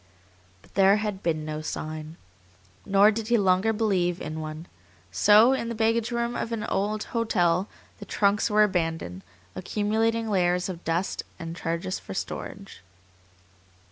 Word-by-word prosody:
But -, -, -22 dB
there 195 Hz, 0 st, +5 dB
had 210 Hz, -2 st, -3 dB
been 155 Hz, -4 st, -1 dB
no 155 Hz, 0 st, -4 dB
sign. 155 Hz, +1 st, -6 dB, 0.7 s
Nor 200 Hz, +2 st, +6 dB
did 220 Hz, 0 st, -4 dB
he 240 Hz, 0 st, +3 dB
longer 190 Hz, +1 st, +3 dB
believe 190 Hz, -6 st, 0 dB
in 155 Hz, +1 st, -5 dB
one. 155 Hz, +1 st, -6 dB, 0.5 s
So 215 Hz, -, +6 dB
in 235 Hz, -3 st, -2 dB
the 235 Hz, -, -4 dB
baggage 225 Hz, +1 st, +1 dB
room 235 Hz, 0 st, -2 dB
of 230 Hz, -, -3 dB
an 225 Hz, -2 st, -2 dB
hotel 205 Hz, -4 st, 0 dB, 0.3 s
the -, -, -8 dB
trunks 205 Hz, +2 st, +1 dB
were 210 Hz, 0 st, +5 dB
abandoned, 165 Hz, -, -1 dB, 0.3 s
accumulating 220 Hz, -, 0 dB
layers 180 Hz, -3 st, +1 dB
of 175 Hz, -2 st, -7 dB
dust 170 Hz, +4 st, -1 dB, 0.2 s
and 165 Hz, -1 st, -6 dB
charges 170 Hz, +2 st, -3 dB
for 95 Hz, -, -9 dB
storage. -, -, -6 dB
195 Hz, 140 wpm, -26 LUFS, 170-220 Hz, 0.7 s, Nor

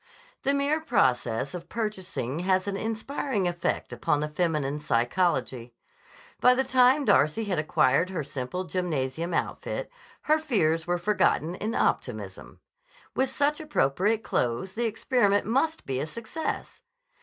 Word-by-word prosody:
The 275 Hz, +1 st, +1 dB
mere 285 Hz, +3 st, +1 dB
process 130 Hz, -, +1 dB
of 175 Hz, -1 st, -7 dB
purchasing 190 Hz, -, -3 dB
has 185 Hz, +1 st, +1 dB
an 200 Hz, -, -1 dB
inspiriting 225 Hz, 0 st, -2 dB
effect 175 Hz, -7 st, -2 dB
upon 135 Hz, +5 st, 0 dB
the 150 Hz, -, -1 dB
feminine 150 Hz, -3 st, -1 dB
psychology. 125 Hz, -3 st, 0 dB, 0.6 s
By 250 Hz, 0 st, +6 dB
the 265 Hz, -, +2 dB
time 260 Hz, +2 st, +4 dB
Darcy 155 Hz, -, +3 dB
had 195 Hz, -6 st, -1 dB
acquired 155 Hz, +2 st, +2 dB
her 180 Hz, -5 st, -3 dB
simple 135 Hz, +6 st, -4 dB
gymnasium 165 Hz, -2 st, -2 dB
outfit, 170 Hz, -, -3 dB, 0.3 s
her 310 Hz, +1 st, +3 dB
fears 165 Hz, -, +1 dB
were 175 Hz, 0 st, +1 dB
forgotten 180 Hz, -3 st, +1 dB
in 215 Hz, +5 st, -3 dB
optimism. -, -, -2 dB, 0.5 s
With 265 Hz, 0 st, +1 dB
such 290 Hz, +3 st, +1 dB
appropriate 215 Hz, -, +1 dB
clothes 120 Hz, +10 st, -1 dB
the 235 Hz, +2 st, -1 dB
experiment 215 Hz, -2 st, +2 dB
must 295 Hz, +9 st, 0 dB
be 130 Hz, -1 st, -2 dB
a 150 Hz, -, -2 dB
success! 235 Hz, -, -5 dB
185 Hz, 135 wpm, -27 LUFS, 150-235 Hz, 0.6 s, By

